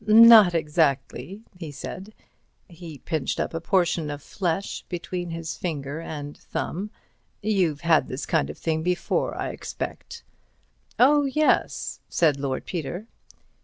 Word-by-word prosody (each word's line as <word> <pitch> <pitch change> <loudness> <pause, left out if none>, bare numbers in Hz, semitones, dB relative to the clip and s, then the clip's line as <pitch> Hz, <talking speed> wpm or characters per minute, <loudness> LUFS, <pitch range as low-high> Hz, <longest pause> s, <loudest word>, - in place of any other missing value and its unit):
"Not 220 -4 +9
exactly," 150 - 0 0.2
he 160 -4 -6
said. 190 +8 -8 0.5
He 170 -4 -10
pinched 155 -1 -2
up - - -2
a 165 - -3
portion 170 -3 +1
of 145 -1 -6
flesh 185 0 -2
between 175 0 -4
his 165 -1 -5
finger 145 -3 -4
and 145 -3 -6
thumb. 195 +5 -4 0.5
"You've 185 -9 +1
had 165 -2 +3
this - - -5
kind 70 - +1
of 75 - -7
thing 160 -1 -1
before, 180 +1 0
I - - -2
expect." - - -6 0.7
"Oh, 290 +3 +5
yes," 305 +3 +1
said 150 -5 +2
Lord 135 -2 -3
Peter. 175 +4 -4
170 Hz, 130 wpm, -25 LUFS, 150-190 Hz, 0.7 s, Not